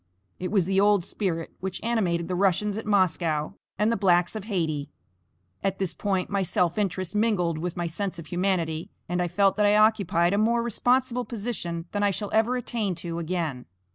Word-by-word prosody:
It 180 - -3
was 195 -5 +2
the 195 +1 +2
old 205 -3 +4
spirit 170 -5 -3
which 190 0 -4
animated 185 -8 0
the 185 - -2
Russians 195 +2 +1
at 220 0 -5
Moscow, 170 -6 +1 0.3
and 210 +3 +2
the - - +2
blacks 180 -2 +2
of 215 -2 -5
Hayti. 160 -8 -2 0.7
At 195 -1 0
this 190 -3 -1
point 195 -3 -1
my 200 -1 0
self 180 0 +1
interest 185 -3 -2
mingled 200 -7 +1
with 175 +1 -4
my 175 - -1
sense 185 +3 -3
of 165 - -8
humanity, 175 -3 -1 0.2
and 180 +1 -1
I 175 - +1
felt 195 +3 +2
that 210 - +3
I 205 - +4
occupied 200 -5 +3
a 200 - +2
more 235 +2 +2
responsible 250 +2 +1
position 200 -8 -4
than 205 - -1
I 205 - +4
shall 200 +1 -3
ever 225 +3 +3
attain 220 -6 -2
to 170 0 -5
again. 160 -7 -3
190 Hz, 195 wpm, -26 LUFS, 170-210 Hz, 0.7 s, old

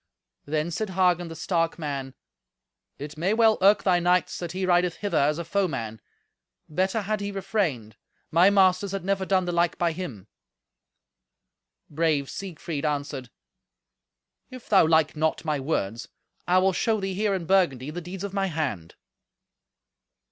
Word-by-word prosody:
Then 155 +3 -1
said 215 +5 -3
Hagen 180 -2 +2
the 165 - -8
stark 165 0 -1
man, 140 -5 -5 0.8
"It 150 +2 -8
may 190 +6 +1
well 225 -1 +4
irk 200 +2 +5
thy 180 -2 +3
knights 180 +1 +1
that 175 -2 -5
he 185 +1 -2
rideth 175 -1 +2
hither 205 +2 -3
as 150 +2 +2
a 170 - -4
foeman. 155 - -2 0.7
Better 190 +7 0
had 215 +2 -1
he 200 0 -3
refrained. 170 - -2 0.3
My 175 +4 +6
masters 195 0 +3
had 195 -2 -4
never 195 -1 0
done 190 -2 +2
the 175 - -2
like 170 0 +1
by 170 -1 +1
him." 160 - -7 1.6
Brave 150 -3 0
Siegfried 170 -5 -5
answered, 145 -4 -3 1.2
"If 255 -2 -11
thou 195 -6 +5
like 160 -1 +3
not 160 +1 -1
my 150 -2 0
words, 120 -6 -2 0.4
I 180 +1 +4
will 190 +1 +3
show 220 +3 +1
thee 195 -1 -3
here, 205 +1 0
in 180 -3 -4
Burgundy, 155 -8 +2
the 175 +3 -5
deeds 180 +3 -7
of 200 -1 -5
my 195 -1 0
hand." 140 - -3
175 Hz, 155 wpm, -26 LUFS, 150-195 Hz, 1.6 s, My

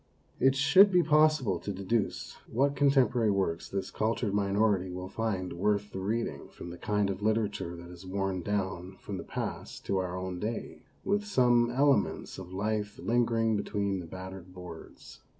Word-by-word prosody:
It 135 0 +4
should 145 +9 +6
be 180 -1 +5
possible 150 - +3
to 100 - -4
deduce 100 +3 -2 0.2
what 140 +4 +2
con 140 0 +4
temporary 125 -5 +3
works 95 -4 0
this 95 -1 -3
cultured 110 -1 -1
minority 100 -1 +2
will 90 +1 -6
find 100 -5 -2
worth 105 +3 0
the 95 - -5
reading 100 -7 -2
from 85 - -9
the 85 - -8
kind 105 -1 +1
of 95 - -6
literature 105 -5 0
that 85 0 -10
has 90 +1 -11
worn 95 0 -2
down 95 -1 -3
from 105 -6 -6
the - - -5
past - - -5
to 95 - +1
our 90 -1 -3
own 95 -1 -4
day, 110 +4 -4 0.2
with 205 +1 +1
some 120 - +4
ele 140 +2 +4
ments 100 - -4
of 90 -1 -9
life 105 +2 -2
lingering 115 +1 +1
between 100 -1 -1
the 85 - -7
battered 95 +1 -8
boards. 90 -3 -11
105 Hz, 175 wpm, -30 LUFS, 95-120 Hz, 0.2 s, should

